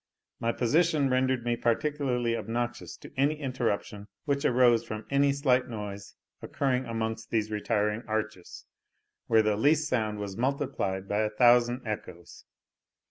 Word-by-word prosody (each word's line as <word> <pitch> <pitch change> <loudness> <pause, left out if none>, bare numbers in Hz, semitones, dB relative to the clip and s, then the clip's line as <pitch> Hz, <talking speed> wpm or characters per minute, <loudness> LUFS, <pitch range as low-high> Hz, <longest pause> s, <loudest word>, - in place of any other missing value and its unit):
My 115 - 0
position 145 +3 +2
rendered 130 -1 +1
me 120 0 +1
particularly 125 -1 0
obnoxious 120 +1 -4
to - - -13
any 145 +3 +1
interruption 115 -6 -3 0.2
which 140 -1 0
arose 120 -2 +4
from 110 0 -6
any 140 0 +3
slight 130 -3 +2
noise 105 -4 -7 0.3
occurring 130 -2 -1
amongst 115 -1 -4
these 110 -1 -1
retiring 105 0 0
arches, 110 -4 -4 0.6
where 110 -1 +4
the 105 -1 +1
least 150 +7 +2
sound 110 -6 -1
was 100 -2 -5
multiplied 120 -7 -2
by 105 +1 0
a 110 0 +1
thousand 120 +2 +4
echoes. 90 -5 -7
120 Hz, 135 wpm, -28 LUFS, 110-130 Hz, 0.6 s, arose